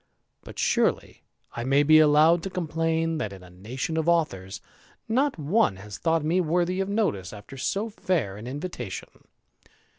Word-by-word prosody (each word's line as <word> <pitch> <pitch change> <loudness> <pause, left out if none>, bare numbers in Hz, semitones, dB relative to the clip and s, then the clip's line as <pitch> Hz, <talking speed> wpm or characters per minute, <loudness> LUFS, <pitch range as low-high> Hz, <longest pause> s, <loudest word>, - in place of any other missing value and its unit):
But - - -12
surely - - 0 0.3
I 120 - -3
may 135 +3 +3
be 155 +1 +7
allowed 155 +3 +5
to 195 - -4
complain, 165 -2 -1
that, 105 - -3
in 95 -2 -11
a 90 - -14
nation 120 - -4
of 160 +1 +1
authors, 105 - 0 0.5
not 265 +3 +1
one 155 - +2
has 100 +1 -9
thought 165 -2 +1
me 175 +4 +2
worthy 175 +2 0
of 195 0 -1
notice 175 - -1
after 105 +6 -11
so 195 - -2
fair 160 - -1
an 105 +4 -9
invitation. 130 - -7
155 Hz, 160 wpm, -26 LUFS, 115-175 Hz, 0.5 s, be